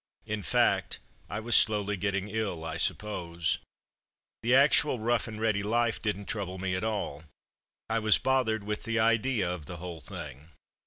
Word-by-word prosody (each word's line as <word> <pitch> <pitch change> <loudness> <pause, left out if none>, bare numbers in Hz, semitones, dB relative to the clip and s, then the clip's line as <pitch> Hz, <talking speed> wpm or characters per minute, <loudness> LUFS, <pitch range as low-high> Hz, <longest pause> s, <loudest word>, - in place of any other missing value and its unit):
In 105 -1 -3
fact, 90 - +2 0.3
I 105 - -3
was 115 +1 +1
slowly 105 -1 +4
getting 100 0 -1
ill, 105 -6 -3
I 80 0 -3
suppose. 85 -6 -1 0.8
The 120 +2 +3
actual 140 0 +5
rough 115 +1 0
and 110 -1 -7
ready 110 -2 +1
life 115 +3 +1
didn't 105 -2 -2
trouble 100 -4 -4
me 95 0 -2
at 90 - -1
all. 100 -9 -3 0.6
I 115 0 +1
was 110 -1 +5
bothered 125 -5 +1
with 105 +1 -4
the 115 0 -1
idea 115 -2 +2
of 85 -5 -4
the 90 - -6
whole 85 -1 -7
thing. 75 -6 -8
105 Hz, 165 wpm, -29 LUFS, 90-110 Hz, 0.8 s, actual